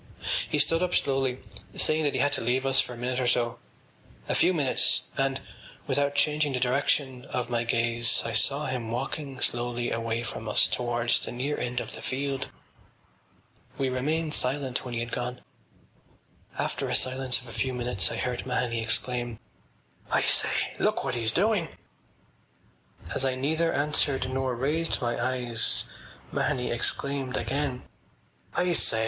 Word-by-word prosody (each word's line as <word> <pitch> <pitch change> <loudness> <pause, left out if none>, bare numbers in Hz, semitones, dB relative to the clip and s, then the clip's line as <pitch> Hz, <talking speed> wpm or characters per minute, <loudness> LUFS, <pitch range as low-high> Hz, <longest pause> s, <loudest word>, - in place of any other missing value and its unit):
He - - +1
stood 165 +3 +3
up 180 0 +1
slowly, 135 -2 +1 0.4
saying 155 +1 +2
that 145 - +1
he - - +1
had 145 0 +2
to - - -1
leave 125 +3 +1
us 135 0 +4
for 125 - 0
a - - -9
minute 125 +1 -1
or 125 - +1
so, 120 -1 +1 0.7
a - - 0
few - - +4
minutes, 145 -7 +2
and, 135 -1 0 0.5
without 145 0 +1
changing 150 0 +2
the 125 - 0
direction 130 0 +1
of 125 -2 -3
my 120 -1 +1
gaze, 115 -1 +2
I 115 - -2
saw 140 +7 +3
him 125 -4 -3
walking 135 +3 -4
slowly 120 0 -1
away 115 0 -1
from 110 -1 -5
us - - +5
towards 120 -1 +1
the - - -6
near 135 +5 -2
end 125 0 -2
of - - -6
the - - -8
field. 135 0 -2 1.3
We 135 -1 +1
remained 150 +5 -1
silent 130 -1 0
when 125 -2 -5
he 115 - -1
had 120 0 -4
gone. 125 +1 -3 1.2
After - - -2
a - - +1
silence 130 0 +1
of 125 - -13
a - - -8
few 130 - 0
minutes 120 -5 -1
I - - -3
heard 125 -1 -2
Mahony 125 -2 -1
exclaim: 120 +1 0 0.7
“I - - +2
say! - - +3
Look - - +1
what 135 - -1
he’s 115 -2 +1
doing!” 185 - +2 1.5
As 130 - +1
I 130 -1 +1
neither 160 +5 +1
answered 145 -3 +1
nor 130 -1 0
raised 150 +7 0
my 120 0 -1
eyes 120 -2 +1 0.5
Mahony 130 -4 0
exclaimed 135 +2 0
again: 135 +1 -2 0.7
“I 180 0 +2
say.... 115 -8 +4
130 Hz, 165 wpm, -28 LUFS, 120-140 Hz, 1.5 s, us